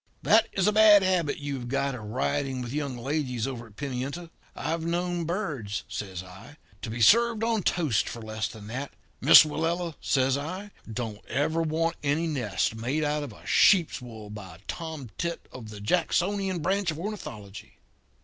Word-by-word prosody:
That 225 Hz, +1 st, +5 dB
is 190 Hz, -, +1 dB
a 210 Hz, -, +4 dB
bad 210 Hz, -2 st, +7 dB
habit 180 Hz, -5 st, +1 dB
you 145 Hz, -1 st, -4 dB
have 120 Hz, -, -7 dB
got 135 Hz, +2 st, 0 dB
of 125 Hz, -, -6 dB
riding 130 Hz, +3 st, -1 dB
with 120 Hz, +1 st, -6 dB
young 140 Hz, -4 st, -2 dB
ladies 130 Hz, -2 st, -2 dB
over 120 Hz, -3 st, -5 dB
at 105 Hz, -, -20 dB
Pimienta. 140 Hz, +6 st, -4 dB, 0.2 s
I've 165 Hz, 0 st, -2 dB
known 175 Hz, 0 st, -1 dB
birds,' 150 Hz, -, -3 dB
says 95 Hz, -3 st, -5 dB
I, 95 Hz, +11 st, -13 dB, 0.2 s
'to -, -, -5 dB
be 115 Hz, +1 st, -4 dB
served 230 Hz, -, +5 dB
on 225 Hz, -2 st, +1 dB
toast 155 Hz, -, +1 dB
for 120 Hz, -, -7 dB
less 110 Hz, -1 st, -3 dB
than 105 Hz, -2 st, -11 dB
that. 130 Hz, +6 st, -5 dB, 0.3 s
Miss -, -, +10 dB
Willella,' 165 Hz, +2 st, -2 dB
says 135 Hz, 0 st, +2 dB
I, 185 Hz, +8 st, -6 dB, 0.2 s
'don't 110 Hz, -2 st, -5 dB
ever 160 Hz, +4 st, 0 dB
want 165 Hz, +1 st, 0 dB
any 150 Hz, +3 st, +1 dB
nest 120 Hz, -12 st, -1 dB
made 125 Hz, +8 st, -1 dB
out 150 Hz, 0 st, 0 dB
of 135 Hz, -8 st, -7 dB
sheep's 175 Hz, -10 st, +4 dB
wool 110 Hz, -4 st, -9 dB
by 95 Hz, -5 st, -9 dB
a -, -, -17 dB
tomtit 160 Hz, -, -5 dB
of 115 Hz, -4 st, -9 dB
the 105 Hz, -1 st, -9 dB
Jacksonian 180 Hz, -, 0 dB
branch 195 Hz, +1 st, +1 dB
of 155 Hz, -, -2 dB
ornithology. 110 Hz, -, -7 dB
145 Hz, 175 wpm, -27 LUFS, 115-170 Hz, 0.3 s, Miss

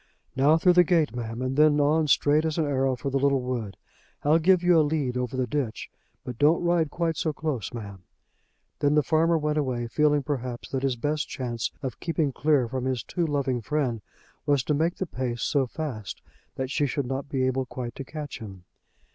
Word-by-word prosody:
"Now 145 Hz, +4 st, +4 dB
through 180 Hz, +2 st, +4 dB
the 180 Hz, 0 st, +7 dB
gate, 160 Hz, -6 st, +1 dB
ma'am, 115 Hz, 0 st, -4 dB
and 130 Hz, +1 st, -2 dB
then 150 Hz, 0 st, +5 dB
on 150 Hz, +2 st, +3 dB
straight 145 Hz, +2 st, +3 dB
as 160 Hz, 0 st, -1 dB
an 160 Hz, -, +2 dB
arrow 135 Hz, -2 st, +1 dB
for 135 Hz, +2 st, -4 dB
the 135 Hz, -, +1 dB
little 140 Hz, 0 st, +3 dB
wood. 120 Hz, -6 st, -4 dB, 0.5 s
I'll 155 Hz, +3 st, +4 dB
give 180 Hz, +2 st, +4 dB
you 175 Hz, -2 st, +5 dB
a -, -, +6 dB
lead 145 Hz, -4 st, 0 dB
over 125 Hz, 0 st, -2 dB
the 130 Hz, -, +1 dB
ditch, 125 Hz, -2 st, -3 dB, 0.3 s
but 125 Hz, -2 st, -7 dB
don't 155 Hz, +4 st, +4 dB
ride 170 Hz, -3 st, +2 dB
quite 165 Hz, 0 st, -1 dB
so 155 Hz, -3 st, -1 dB
close, 145 Hz, -7 st, -3 dB
ma'am." 100 Hz, -5 st, -8 dB, 0.8 s
Then 145 Hz, 0 st, +2 dB
the 150 Hz, -, +4 dB
farmer 165 Hz, +2 st, +3 dB
went 150 Hz, 0 st, 0 dB
away 125 Hz, -4 st, -1 dB
feeling 150 Hz, +4 st, +2 dB
perhaps 125 Hz, -4 st, -4 dB
that 135 Hz, -, -2 dB
his 135 Hz, -2 st, 0 dB
best 150 Hz, +5 st, -2 dB
chance 120 Hz, -4 st, -3 dB
of 130 Hz, -, -4 dB
keeping 160 Hz, -4 st, 0 dB
clear 140 Hz, -1 st, +2 dB
from 130 Hz, +1 st, -3 dB
his 130 Hz, -4 st, -1 dB
too 170 Hz, +4 st, -2 dB
loving 135 Hz, -4 st, -1 dB
friend 125 Hz, -3 st, -1 dB, 0.5 s
was 140 Hz, -3 st, +3 dB
to 150 Hz, -, 0 dB
make 165 Hz, +4 st, +1 dB
the 190 Hz, -, -3 dB
pace 125 Hz, -6 st, -3 dB
so 140 Hz, -3 st, +1 dB
fast 125 Hz, -7 st, -6 dB, 0.3 s
that 130 Hz, 0 st, -3 dB
she 145 Hz, -1 st, +1 dB
should 140 Hz, +1 st, -2 dB
not 135 Hz, +2 st, -4 dB
be 130 Hz, -2 st, 0 dB
able 130 Hz, 0 st, 0 dB
quite 120 Hz, -2 st, -6 dB
to 135 Hz, -, -7 dB
catch 150 Hz, 0 st, -7 dB
him. 95 Hz, -5 st, -10 dB
140 Hz, 210 wpm, -26 LUFS, 125-155 Hz, 0.8 s, the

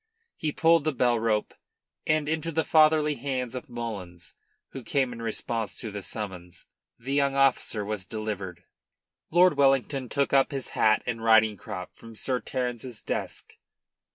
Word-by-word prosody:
He 155 Hz, -, -2 dB
pulled 165 Hz, +1 st, +4 dB
the 155 Hz, 0 st, 0 dB
bell 120 Hz, -2 st, +2 dB
rope, 110 Hz, -2 st, 0 dB, 0.5 s
and 155 Hz, -1 st, +2 dB
into 160 Hz, +1 st, -1 dB
the 160 Hz, 0 st, +1 dB
fatherly 155 Hz, -1 st, +4 dB
hands 130 Hz, -2 st, -3 dB
of 125 Hz, -, -7 dB
Mullins, 100 Hz, -8 st, -7 dB, 0.4 s
who 135 Hz, -, -8 dB
came 130 Hz, +1 st, 0 dB
in 115 Hz, -, -8 dB
response 115 Hz, -1 st, -3 dB
to 110 Hz, -4 st, -5 dB
the 100 Hz, 0 st, -5 dB
summons, 95 Hz, -4 st, -7 dB, 0.3 s
the 130 Hz, +4 st, -5 dB
young 140 Hz, -1 st, +2 dB
officer 135 Hz, -6 st, +2 dB
was 105 Hz, -3 st, -4 dB
delivered. 100 Hz, -6 st, -5 dB, 0.7 s
Lord 175 Hz, -2 st, +5 dB
Wellington 135 Hz, -1 st, +2 dB
took 140 Hz, -1 st, 0 dB
up 135 Hz, -1 st, +5 dB
his 135 Hz, -2 st, -4 dB
hat 110 Hz, 0 st, +3 dB
and 115 Hz, -2 st, -3 dB
riding 110 Hz, -1 st, +5 dB
crop 90 Hz, -1 st, -7 dB
from 115 Hz, -1 st, -13 dB
Sir 125 Hz, +3 st, -1 dB
Terence's 125 Hz, -3 st, -4 dB
desk. -, -, -5 dB
120 Hz, 155 wpm, -27 LUFS, 110-140 Hz, 0.7 s, Lord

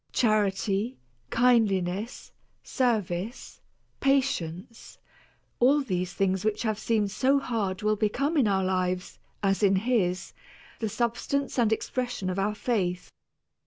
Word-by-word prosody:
Charity, 210 Hz, 0 st, +1 dB, 0.3 s
kindliness, 215 Hz, -4 st, +1 dB, 0.3 s
service, 220 Hz, -4 st, -2 dB, 0.4 s
patience, 230 Hz, -8 st, -1 dB, 0.6 s
all 275 Hz, +4 st, +5 dB
these 180 Hz, -8 st, -2 dB
things 190 Hz, -1 st, +1 dB
which 215 Hz, +1 st, 0 dB
have 215 Hz, -2 st, -1 dB
seemed 215 Hz, -4 st, 0 dB
so 270 Hz, +6 st, +3 dB
hard 215 Hz, -8 st, -2 dB
will 215 Hz, 0 st, +2 dB
become 245 Hz, +9 st, 0 dB
in 270 Hz, -7 st, +4 dB
our 190 Hz, -1 st, +2 dB
lives, 185 Hz, -1 st, -1 dB, 0.2 s
as 195 Hz, +1 st, +2 dB
in 195 Hz, -2 st, +4 dB
his, 190 Hz, -4 st, 0 dB, 0.5 s
the 220 Hz, -, -1 dB
substance 240 Hz, +5 st, -1 dB
and 225 Hz, -2 st, +3 dB
expression 240 Hz, -4 st, -2 dB
of 185 Hz, -, -3 dB
our 210 Hz, +2 st, 0 dB
faith. 185 Hz, -6 st, -1 dB
215 Hz, 120 wpm, -27 LUFS, 190-240 Hz, 0.6 s, all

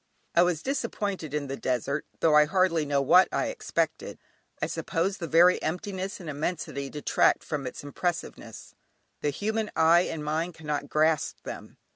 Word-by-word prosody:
I 170 Hz, -, +5 dB
was 175 Hz, -3 st, +1 dB
disappointed 205 Hz, -, -3 dB
in 150 Hz, -1 st, -2 dB
the 135 Hz, 0 st, -4 dB
desert, 135 Hz, +3 st, -2 dB
though 160 Hz, -, +4 dB
I 150 Hz, 0 st, +7 dB
hardly 170 Hz, -3 st, +1 dB
know 140 Hz, -1 st, +1 dB
what 180 Hz, +7 st, +6 dB
I -, -, 0 dB
expected; -, -, -2 dB, 0.4 s
I -, -, 0 dB
suppose 185 Hz, +4 st, -2 dB
the 170 Hz, -, -4 dB
very 175 Hz, +3 st, +5 dB
emptiness 190 Hz, +4 st, -3 dB
and 175 Hz, -, -9 dB
immensity 145 Hz, -2 st, -3 dB
detract 150 Hz, +1 st, +2 dB
from 140 Hz, -4 st, -4 dB
its 125 Hz, -, -7 dB
impressiveness; 170 Hz, +4 st, -5 dB, 0.5 s
the 150 Hz, -, +1 dB
human 215 Hz, +7 st, -2 dB
eye 165 Hz, +2 st, +5 dB
and 155 Hz, -2 st, -5 dB
mind 160 Hz, +3 st, -2 dB
cannot 150 Hz, -2 st, -4 dB
grasp 155 Hz, 0 st, +1 dB
them. -, -, -8 dB
160 Hz, 160 wpm, -27 LUFS, 150-180 Hz, 0.5 s, I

